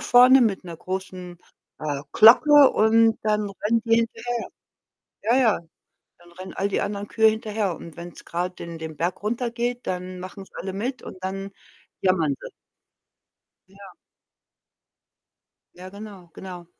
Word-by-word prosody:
vorne 250 +2 +6
mit 210 -6 +1
'ner 170 -2 -7
großen, 185 0 -6 0.4
äh, 145 -2 -3
Glocke 280 +6 +7
und 225 +1 +3
dann 210 -1 0
rennen 225 +2 +1
die 230 -1 +3
hinterher. 230 +1 -2 0.9
Ja, 230 +4 +2
ja. 240 -5 +3 0.6
Dann 175 0 -19
rennen 185 +2 -9
all 195 - -1
die 200 - -1
anderen 200 0 -4
Kühe 220 -1 +4
hinterher 215 -4 -2
und 165 -1 -12
wenn's 170 0 -10
grad 180 +2 -4
den 170 -1 -8
den 160 -1 -7
Berg 175 +4 -2
runtergeht, 240 +2 -2
dann 180 0 -4
machen's 190 +1 -10
alle 190 +2 -5
mit 250 +6 -3
und - - -9
dann 195 +1 -4 0.5
jammern 170 -6 +2
sie. - - -9 1.2
Ja. 195 0 -14 1.8
Ja, 185 +1 -10
genau, 200 -3 -11
genau. 180 -2 -9
200 Hz, 140 wpm, -24 LUFS, 180-225 Hz, 1.8 s, Glocke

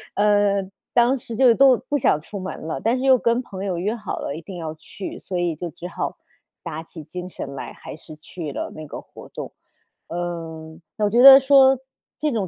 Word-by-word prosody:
呃， 205 -2 +2 0.2
当 245 +3 +4
时 235 -1 -7
就 245 0 +6
都 265 0 +6
不 290 - -2
想 190 - +2
出 200 +5 -8
门 185 +1 -6
了， 160 - -4
但 230 +3 +2
是 255 - -3
又 260 -1 +6
跟 235 +1 +1
朋 195 -5 -7
友 185 -3 -2
约 200 +6 -1
好 215 -4 -5
了， 140 - -4
一 160 - -7
定 180 +2 -9
要 160 -2 -5
去， 190 +4 -8
所 185 - -5
以 175 -2 0
就 170 +3 -5
只 170 +3 -9
好 175 - -4 0.5
打 160 -2 -5
起 165 0 -11
精 180 +4 -7
神 140 -5 -7
来， - - -7
还 - - -10
是 155 0 -12
去 155 -1 -7
了 - - -5
那 155 - -8
个 - - -7
活 - - -14
动。 - - -7 0.6
呃， 165 -2 -6 0.2
我 210 -1 +1
觉 235 - +2
得 270 0 +12
说 270 -1 +5 0.4
这 300 -1 0
种 210 -5 -1
190 Hz, 230 characters per minute, -22 LUFS, 165-235 Hz, 0.6 s, 得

